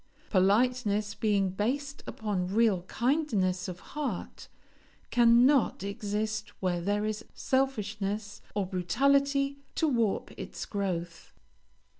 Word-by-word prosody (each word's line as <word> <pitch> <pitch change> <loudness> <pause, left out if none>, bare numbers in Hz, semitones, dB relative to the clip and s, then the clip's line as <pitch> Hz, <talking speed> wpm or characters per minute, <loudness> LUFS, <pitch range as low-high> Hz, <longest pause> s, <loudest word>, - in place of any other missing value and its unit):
Politeness, 210 +1 +2
being 200 -3 +1
based 275 +8 -2
upon 200 -4 -2
real 205 -1 +3
kindness 220 - 0
of 180 -1 -6
heart, 280 -10 -4 0.6
cannot 240 -1 +5
exist 210 +1 -2
where 180 -2 0
there 205 +3 0
is 215 0 -3
selfishness 210 -6 -1
or 200 -2 +1
brutality 275 +10 +2 0.2
to 320 - +2
warp 230 -7 0
its - - -6
growth. 175 -4 -4
210 Hz, 100 wpm, -29 LUFS, 195-255 Hz, 0.6 s, cannot